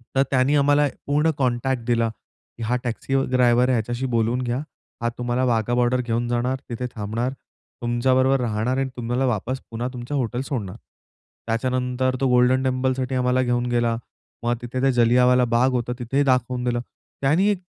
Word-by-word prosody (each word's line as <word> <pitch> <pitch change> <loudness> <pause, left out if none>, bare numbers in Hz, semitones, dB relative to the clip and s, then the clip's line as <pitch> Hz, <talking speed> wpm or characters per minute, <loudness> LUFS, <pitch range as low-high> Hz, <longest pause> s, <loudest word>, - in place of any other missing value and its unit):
तर 135 - +5
त्यांनी 130 +2 +3
आम्हाला 145 0 +4 0.2
पूर्ण 150 +3 +2
कॉन्टॅक्ट 130 -1 0
दिला 115 -1 +2 0.5
की 115 - -5
हा 120 +3 0
टॅक्सी 125 +2 -2 0.2
ड्रायव्हर 125 0 +4
आहे - - +3
ह्याच्याशी 120 +3 -2
बोलून 115 +3 +1
घ्या. 120 +1 -1 0.4
हा 120 - +1
तुम्हाला 120 +1 -1
वाघा 120 0 +1
बॉर्डर 125 +1 +2
घेऊन 120 0 -1
जाणार, 125 +2 0
तिथे 120 +1 -4
थांबणार, 110 +4 -2 0.5
तुमच्याबरोबर 130 +3 +2
राहणार 115 +2 -1
आणि 135 0 0
तुम्हाला 120 +2 -1
वापस 125 +3 -2
पुन्हा 115 +2 -3
तुमच्या 125 +4 -4
हॉटेल 125 0 -1
सोडणार. 110 - -4 0.7
त्याच्यानंतर 125 +2 0
तो 135 - +3
गोल्डन 125 +1 +4
टेम्पलसाठी 130 0 0
आम्हाला 125 0 +2
घेऊन 120 0 0
गेला. 120 -1 +1 0.5
मग 120 0 +1
तिथे 120 +1 -4
त्या 135 - +3
जालियनवाला 125 +1 +4
बाग 130 +3 +4
होता, 125 -1 -1
तिथे 135 +4 0
दाखवून 125 -1 +1
दिलं. 120 -1 0 0.4
त्यांनी 155 +9 +3
एक 200 -3 0
125 Hz, 165 wpm, -23 LUFS, 120-130 Hz, 0.7 s, तर